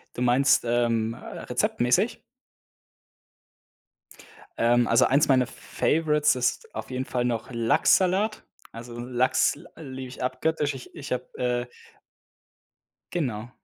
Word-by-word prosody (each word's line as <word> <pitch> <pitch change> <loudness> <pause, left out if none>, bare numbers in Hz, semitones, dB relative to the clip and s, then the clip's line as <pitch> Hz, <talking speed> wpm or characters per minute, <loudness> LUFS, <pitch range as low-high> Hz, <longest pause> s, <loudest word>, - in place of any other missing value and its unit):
Du 125 - -5
meinst, 125 +2 +4
ähm, 115 -1 +1
äh, - - -9
rezeptmäßig? - - 0 2.4
Ähm, 120 +1 +3
also, 115 - +5
eins 140 +3 +3
meiner 130 -2 +3
Favorites 150 -2 +1
ist 285 - -2
auf - - -6
jeden 130 +1 -2
Fall 125 -1 -1
noch 115 -1 -2
Lachssalat. 185 - +2 0.3
Also, 120 +1 -9
Lachs 125 +2 +1
l - - -15 0.2
liebe 130 0 -6
ich 125 - -7
abgöttisch. 145 +3 -1
Ich 130 - -11
ich 145 -2 -8
habe, 125 0 -1
äh 125 0 0 1.5
Genau. 120 -9 -2
125 Hz, 120 wpm, -26 LUFS, 120-145 Hz, 2.4 s, also